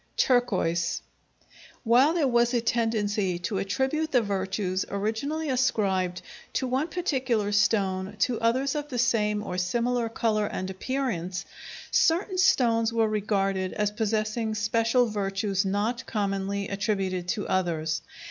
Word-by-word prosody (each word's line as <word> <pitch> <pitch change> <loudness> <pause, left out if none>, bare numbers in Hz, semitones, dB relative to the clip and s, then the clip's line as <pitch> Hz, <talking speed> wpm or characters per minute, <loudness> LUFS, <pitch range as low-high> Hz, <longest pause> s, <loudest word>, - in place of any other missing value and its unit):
Turquoise 180 -9 +1 0.8
While 255 +7 +4
there 310 -5 +2
was 240 0 +2
a 235 - +2
tendency 210 -5 0
to 190 +3 -2
attribute 265 +10 -1
the 245 -3 +3
virtues 190 -1 -1
originally 225 +11 -2
ascribed 200 -9 0 0.3
to - - 0
one 260 +5 0
particular 255 - -1
stone 200 -2 +1
to 235 +2 +1
others 255 +4 +1
of 295 -1 -4
the 250 - -4
same 210 -3 +1
or 180 -3 -3
similar 235 +5 0
color 215 -2 0
and 185 -1 -4
appearance, 195 -5 -3 0.5
certain 365 +3 +2
stones 235 -12 +3
were 225 -1 +2
regarded 195 -3 0
as 210 -1 0
possessing 215 +1 -1
special 230 +3 +2
virtues 200 -2 -1
not 205 +5 -1
commonly 200 -1 -2
attributed 195 -3 -1
to 205 +3 -2
others. 160 -4 0
215 Hz, 130 wpm, -27 LUFS, 195-245 Hz, 0.8 s, While